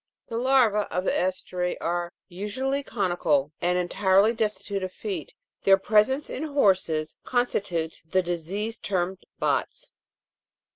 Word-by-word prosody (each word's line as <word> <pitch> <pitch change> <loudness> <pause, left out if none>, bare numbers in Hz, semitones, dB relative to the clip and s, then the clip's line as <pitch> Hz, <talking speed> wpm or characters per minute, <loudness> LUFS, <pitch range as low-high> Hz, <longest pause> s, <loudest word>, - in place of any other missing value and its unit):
The 230 - -4
larvae 240 -5 +3
of 180 - -1
the - - +1
GEstri 180 -1 -1
are 175 +1 -2 0.2
usually 210 +9 -2
conical 175 - 0
and 180 +1 +2
entirely 190 +4 +3
destitute 210 -3 -2
of 185 -1 -3
feet; 185 -7 -5 0.3
their 195 0 +6
presence 215 +8 +2
in - - -5
horses 190 - +1
constitutes 195 -10 -1
the 185 +4 0
disease 185 +6 -3
termed 185 -1 -1 0.2
bots. - - -1
195 Hz, 125 wpm, -26 LUFS, 175-220 Hz, 0.3 s, their